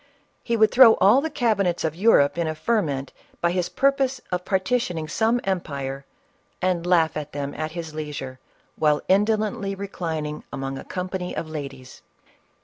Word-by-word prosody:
He 230 -1 0
would 220 0 +4
throw 240 -3 +8
all 215 +8 +5
the 320 - -2
cabinets 215 - 0
of 160 -2 0
Eu 210 +7 +4
rope 140 0 +4
in 170 -1 -1
a 155 - -2
ferment 155 - -1 0.3
by 170 - +1
his 180 -1 -1
purpose 270 -1 +1
of 180 0 -1
partitioning 190 -4 -1
some 225 +7 +1
empire, 140 -7 -3 0.5
and 180 -2 0
laugh 165 -3 +3
at 150 -1 -5
them 140 0 -4
at 155 0 -4
his 165 -2 -6
leisure, 145 -4 -6 0.4
while 150 -1 +2
indo 210 +3 +4
lently 210 -2 -3
reclining 160 -6 -4
among 135 0 -4
a - - -8
company 180 0 -4
of 165 - -4
ladies. 140 -4 -8
175 Hz, 165 wpm, -24 LUFS, 150-210 Hz, 0.5 s, throw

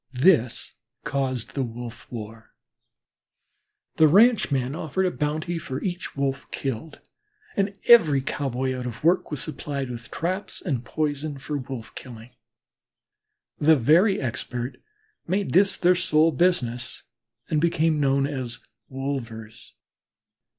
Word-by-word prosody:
This 130 -5 +3 0.3
caused 130 -4 -2
the 140 - -1
wolf 120 -1 -7
war. 110 -1 -9 1.4
The 160 - +7
ranchmen 155 - +4
offered 170 +4 -1
a 180 - +1
bounty 155 +3 -2
for 130 -4 -5
each 180 -5 -4
Wolf 135 -1 -2
killed, 135 +3 -4 0.6
and 200 0 0
every 165 -13 +7
cowboy 130 -1 -2
out 125 -1 -4
of 115 +1 -7
work, 170 +3 +3
was 145 -5 -3
supplied 140 -3 -4
with 120 -1 -8
traps 185 +4 -3
and 135 -9 -2
poison 150 +1 -2
for 145 +2 -5
wolf 125 -3 -7
killing. 120 -1 -10 1.3
The 160 +2 +6
very 165 - +4
expert 125 0 -4 0.5
made 195 +3 -1
this 195 +2 +4
their 180 +1 +4
sole 165 -3 +3
business 130 -7 0 0.5
and 155 -2 +2
became 160 -2 +2
known 135 -1 +2
as 130 -4 -4 0.3
wolvers. 120 -5 -6
140 Hz, 120 wpm, -25 LUFS, 125-165 Hz, 1.4 s, The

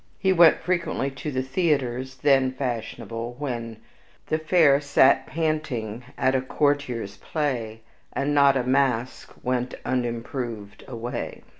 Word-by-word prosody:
He 190 -1 +2
went 170 -2 +6
frequently 170 -5 -1
to 135 +3 -6
the 130 -1 -1
theaters, 130 -4 -1
THEN 135 -1 +3
fashionable, 120 -2 -4
when 120 -5 -4 0.5
"The 155 - -1
fair 155 -3 +4
sat 140 -1 +4
panting 150 -9 -2
at 130 - +2
a 130 - +2
courtier's 130 -6 -1
play, 120 -8 -3 0.3
And 140 +1 -1
not 140 -1 +5
a 130 - 0
mask 130 -2 0
went 125 0 -1
unimproved 120 -3 -3
away." 120 -1 -5
130 Hz, 125 wpm, -25 LUFS, 120-145 Hz, 0.5 s, went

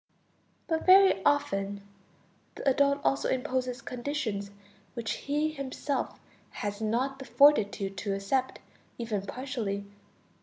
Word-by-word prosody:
But 320 +1 -2
very 380 - +7
often 200 -7 0 0.7
the - - -5
adult 280 +1 +3
also 275 - +1
imposes 255 -1 -1
conditions 240 -6 -3 0.5
which 230 -2 -3 0.2
he 300 +2 +1
himself 275 -1 -3 0.3
has 205 +1 -5
not 250 +5 0
the 270 - -7
fortitude 205 -10 +3
to 195 +1 -2
accept 255 +7 -1 0.4
even 225 -4 -2
partially 225 -6 -3
255 Hz, 110 wpm, -29 LUFS, 205-280 Hz, 0.7 s, very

